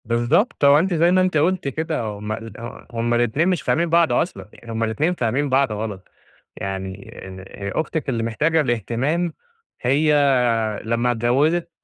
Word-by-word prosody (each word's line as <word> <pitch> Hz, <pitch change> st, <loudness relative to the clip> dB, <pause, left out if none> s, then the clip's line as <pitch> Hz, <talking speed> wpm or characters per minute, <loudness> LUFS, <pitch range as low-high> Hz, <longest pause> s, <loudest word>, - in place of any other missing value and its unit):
بالضبط، 120 Hz, -, +1 dB
هو 140 Hz, +1 st, +7 dB
أنتِ 185 Hz, +3 st, 0 dB
زي 170 Hz, +1 st, +3 dB
ما 185 Hz, 0 st, +4 dB
أنتِ 185 Hz, -4 st, +1 dB
قُلتِ 175 Hz, +1 st, +1 dB
كده 155 Hz, +1 st, -2 dB
هُم 105 Hz, -1 st, -5 dB
ال 115 Hz, 0 st, -6 dB
ه 120 Hz, +1 st, -9 dB
هُم 120 Hz, 0 st, -1 dB
الاتنين 120 Hz, +8 st, +1 dB
مش 180 Hz, -5 st, 0 dB
فاهمين 170 Hz, +4 st, 0 dB
بعض 170 Hz, 0 st, +3 dB
أصلًا، 175 Hz, -, -2 dB
يعني 115 Hz, -, -11 dB
هُم 115 Hz, 0 st, -1 dB
الاتنين 115 Hz, +11 st, 0 dB
فاهمين 135 Hz, 0 st, -1 dB
بعض 135 Hz, -2 st, +2 dB
غلط، 105 Hz, -3 st, -5 dB, 0.5 s
يعني 95 Hz, -1 st, -6 dB
إن 95 Hz, 0 st, -9 dB
هي 100 Hz, 0 st, -6 dB
أختِك 160 Hz, -2 st, -2 dB
اللي 115 Hz, -3 st, -1 dB
محتاجة 150 Hz, +8 st, +1 dB
الاهتمام، 130 Hz, -, -1 dB, 0.5 s
هي 145 Hz, +5 st, +2 dB, 0.7 s
لمّا 115 Hz, +2 st, 0 dB
اتجوزت 140 Hz, +9 st, +1 dB
130 Hz, 165 wpm, -21 LUFS, 115-160 Hz, 0.7 s, هو